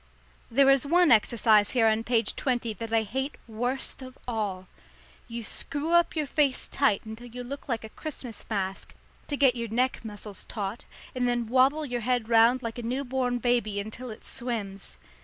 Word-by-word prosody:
There 275 Hz, +3 st, +5 dB
is 275 Hz, -1 st, +4 dB
one 345 Hz, 0 st, +5 dB
exercise 215 Hz, -2 st, +5 dB
here 230 Hz, -, +5 dB
on 220 Hz, 0 st, +3 dB
page 230 Hz, -2 st, +2 dB
twenty 240 Hz, -4 st, -1 dB
that 225 Hz, +2 st, -7 dB
I 225 Hz, -1 st, +3 dB
hate 265 Hz, +6 st, -3 dB
worst 245 Hz, +5 st, -2 dB
of 255 Hz, -1 st, -10 dB
all. 205 Hz, -6 st, -2 dB, 0.6 s
You 235 Hz, -1 st, -5 dB
screw 290 Hz, +8 st, -3 dB
up 345 Hz, 0 st, +4 dB
your 305 Hz, -2 st, 0 dB
face 280 Hz, -1 st, +1 dB
tight 270 Hz, -9 st, +1 dB
until 220 Hz, +3 st, -8 dB
you 245 Hz, +1 st, -7 dB
look 275 Hz, +3 st, -8 dB
like 230 Hz, -3 st, -1 dB
a 220 Hz, -, -8 dB
Christmas 250 Hz, -4 st, -7 dB
mask 195 Hz, -3 st, -3 dB, 0.3 s
to 285 Hz, -, -2 dB
get 270 Hz, -3 st, +4 dB
your 235 Hz, -1 st, -4 dB
neck 250 Hz, +3 st, 0 dB
muscles 210 Hz, -2 st, -6 dB
taut, 205 Hz, 0 st, -5 dB, 0.3 s
and 250 Hz, -1 st, 0 dB
then 240 Hz, -1 st, +1 dB
wobble 265 Hz, +6 st, +3 dB
your 245 Hz, -3 st, -3 dB
head 245 Hz, -1 st, 0 dB
round 235 Hz, +3 st, +5 dB
like 230 Hz, +1 st, -4 dB
a -, -, -3 dB
new 255 Hz, +4 st, -2 dB
born 250 Hz, -1 st, 0 dB
baby 235 Hz, -4 st, +1 dB
until 220 Hz, +5 st, -6 dB
it 215 Hz, -, -10 dB
swims. 215 Hz, -6 st, -4 dB
240 Hz, 185 wpm, -27 LUFS, 220-260 Hz, 0.6 s, There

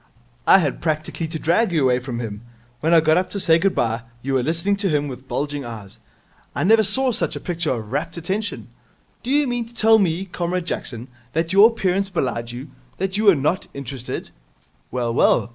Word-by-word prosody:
I -, -, +8 dB
had 150 Hz, -8 st, -1 dB
practically 155 Hz, +1 st, -2 dB
to 160 Hz, 0 st, -4 dB
drag 175 Hz, +7 st, +2 dB
you 160 Hz, -4 st, +2 dB
away 125 Hz, -1 st, +3 dB
from 125 Hz, -2 st, -5 dB
him. 105 Hz, -3 st, -5 dB, 0.4 s
When 160 Hz, -, 0 dB
I 165 Hz, -1 st, +7 dB
got 155 Hz, +1 st, +3 dB
up 185 Hz, 0 st, 0 dB
to 200 Hz, -, -3 dB
say 165 Hz, -3 st, +5 dB
good 195 Hz, +2 st, +1 dB
bye, 115 Hz, 0 st, 0 dB, 0.2 s
you 135 Hz, +1 st, -2 dB
were 130 Hz, -, +3 dB
listening 170 Hz, +8 st, 0 dB
to 200 Hz, -1 st, 0 dB
him 145 Hz, -2 st, +1 dB
with 130 Hz, -1 st, -9 dB
bulging 145 Hz, 0 st, -3 dB
eyes. 110 Hz, -5 st, -9 dB, 0.6 s
I -, -, 0 dB
never 220 Hz, +4 st, +6 dB
saw 250 Hz, +6 st, +1 dB
such 235 Hz, -, -2 dB
a -, -, -4 dB
picture 170 Hz, -3 st, -3 dB
of 110 Hz, -3 st, -4 dB
rapt 165 Hz, +5 st, -3 dB
attention. 190 Hz, +6 st, -3 dB, 0.5 s
Do 245 Hz, -, -7 dB
you 290 Hz, +2 st, +3 dB
mean 245 Hz, -2 st, -2 dB
to 235 Hz, -, -18 dB
tell 220 Hz, 0 st, +5 dB
me, 185 Hz, -1 st, 0 dB
Comrade 180 Hz, -1 st, -3 dB
Jackson, 120 Hz, -8 st, -4 dB, 0.3 s
that 165 Hz, +2 st, -1 dB
your 200 Hz, +3 st, +8 dB
appearance 195 Hz, -3 st, 0 dB
belied 125 Hz, -9 st, -2 dB
you, 130 Hz, +4 st, -8 dB, 0.3 s
that 190 Hz, +1 st, -2 dB
you 215 Hz, +2 st, 0 dB
were 200 Hz, -4 st, +7 dB
not 150 Hz, +6 st, -1 dB
interested? 135 Hz, -2 st, -6 dB, 0.6 s
Well, 120 Hz, -2 st, -2 dB
well. 120 Hz, -, +3 dB
165 Hz, 210 wpm, -22 LUFS, 135-195 Hz, 0.6 s, I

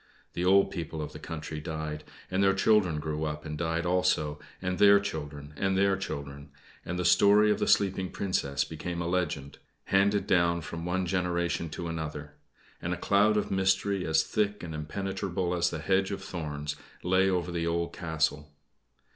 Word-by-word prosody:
The 85 Hz, -, -2 dB
old 95 Hz, +1 st, +5 dB
people 80 Hz, -3 st, -5 dB
of 75 Hz, -, -5 dB
the -, -, -8 dB
country 75 Hz, -1 st, -6 dB
died, 75 Hz, -1 st, -5 dB, 0.3 s
and 95 Hz, +1 st, +1 dB
their 95 Hz, 0 st, +4 dB
children 100 Hz, -6 st, +3 dB
grew 75 Hz, 0 st, -3 dB
up 75 Hz, 0 st, -4 dB
and 75 Hz, -1 st, -4 dB
died 80 Hz, +1 st, -1 dB
also, 75 Hz, -4 st, +1 dB, 0.2 s
and 90 Hz, -1 st, -2 dB
their 100 Hz, 0 st, +8 dB
children, 75 Hz, -6 st, -6 dB
and 95 Hz, +4 st, 0 dB
their 100 Hz, 0 st, +3 dB
children, 70 Hz, -6 st, -6 dB, 0.3 s
and 90 Hz, -, -4 dB
the 90 Hz, -, -1 dB
story 100 Hz, +4 st, +6 dB
of -, -, +1 dB
the -, -, 0 dB
sleeping 95 Hz, -2 st, +2 dB
Princess 70 Hz, -8 st, -1 dB
became 85 Hz, +4 st, -5 dB
a 85 Hz, -, -2 dB
legend, 80 Hz, -6 st, -2 dB, 0.2 s
handed 100 Hz, 0 st, +2 dB
down 85 Hz, -2 st, +2 dB
from 85 Hz, +1 st, -6 dB
one 90 Hz, +1 st, 0 dB
generation 85 Hz, -2 st, -1 dB
to 85 Hz, +2 st, -5 dB
another; 75 Hz, -3 st, -5 dB, 0.5 s
and 90 Hz, +1 st, -1 dB
a -, -, -10 dB
cloud 105 Hz, +4 st, +3 dB
of 105 Hz, -, -1 dB
mystery, 95 Hz, 0 st, +1 dB
as 80 Hz, -2 st, +2 dB
thick 105 Hz, -2 st, -1 dB
and 85 Hz, -2 st, -6 dB
impenetrable 95 Hz, +3 st, -3 dB
as 90 Hz, 0 st, +2 dB
the 85 Hz, -, -4 dB
hedge 95 Hz, +4 st, +1 dB
of 100 Hz, -1 st, -5 dB
thorns, 75 Hz, -5 st, -4 dB, 0.3 s
lay 95 Hz, +2 st, +3 dB
over 90 Hz, -1 st, -1 dB
the 85 Hz, -1 st, -1 dB
old 85 Hz, 0 st, -1 dB
castle. 75 Hz, -2 st, -1 dB
85 Hz, 180 wpm, -29 LUFS, 80-95 Hz, 0.5 s, their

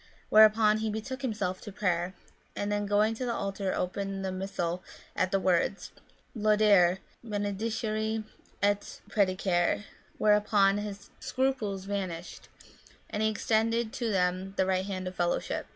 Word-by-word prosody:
Whereupon 215 Hz, 0 st, +6 dB
he 220 Hz, 0 st, -1 dB
betook 240 Hz, +5 st, -4 dB
himself 205 Hz, -7 st, -2 dB
to 205 Hz, -, -8 dB
prayer; 180 Hz, -2 st, -1 dB, 0.4 s
and 205 Hz, 0 st, -2 dB
then 205 Hz, 0 st, 0 dB
going 210 Hz, +2 st, +3 dB
to 225 Hz, -, -5 dB
the 235 Hz, -1 st, -1 dB
altar 195 Hz, -1 st, -2 dB
opened 195 Hz, +1 st, -2 dB
the 190 Hz, -, -1 dB
Missal 185 Hz, -2 st, -3 dB, 0.3 s
at 185 Hz, -, +1 dB
the 195 Hz, -, +2 dB
words, 185 Hz, +1 st, +1 dB, 0.2 s
" -, -, -36 dB
Laudare, 210 Hz, -4 st, +4 dB, 0.3 s
benedicere, 215 Hz, +1 st, -2 dB, 0.4 s
et 205 Hz, 0 st, 0 dB
predicare," 185 Hz, -2 st, +1 dB, 0.3 s
whereupon 210 Hz, -1 st, +4 dB
his 200 Hz, -1 st, -7 dB
scruples 230 Hz, -8 st, -1 dB
vanished, 185 Hz, -4 st, -5 dB, 0.6 s
and 210 Hz, -, -2 dB
he 220 Hz, -, +3 dB
extended 225 Hz, +1 st, +1 dB
to 235 Hz, -2 st, -2 dB
them 185 Hz, 0 st, 0 dB
the 190 Hz, -, +3 dB
right 190 Hz, 0 st, 0 dB
hand 185 Hz, -2 st, -4 dB
of 185 Hz, -, -5 dB
fellowship. 175 Hz, -1 st, -1 dB
205 Hz, 140 wpm, -29 LUFS, 190-215 Hz, 0.6 s, Whereupon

